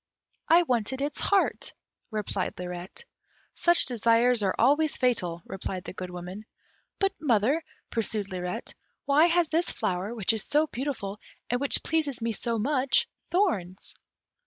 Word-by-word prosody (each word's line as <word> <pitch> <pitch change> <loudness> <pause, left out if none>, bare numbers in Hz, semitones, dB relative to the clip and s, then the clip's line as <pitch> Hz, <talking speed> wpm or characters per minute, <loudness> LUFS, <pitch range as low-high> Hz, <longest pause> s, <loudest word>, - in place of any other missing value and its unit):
"I 340 +2 +6
wanted 250 -3 -1
its 285 +1 -2
heart," 400 -1 +1 0.4
replied 210 -3 -3
Lirette. 180 - -7 0.5
"Such 345 0 +5
desires 235 0 +3
are 195 -2 +1
always 290 +6 +3
fatal," 180 -10 0
replied 190 -1 -5
the - - -7
Good 185 -1 -6
Woman. 180 +4 -8 0.5
"But, 390 -1 +1
mother," 265 +3 +2 0.3
pursued 215 -3 -1
Lirette, 180 -1 -4 0.3
"why 295 +4 +5
has 345 -1 +2
this 335 +2 +1
flower, 200 +1 -2
which 220 -1 +2
is 220 - -1
so 300 +2 +2
beautiful, 240 -8 -4 0.3
and 245 +1 0
which 280 - +2
pleases 305 -5 0
me 230 0 -1
so 230 +1 -2
much, 275 - +2 0.2
thorns?" 210 - 0
235 Hz, 140 wpm, -27 LUFS, 195-295 Hz, 0.5 s, I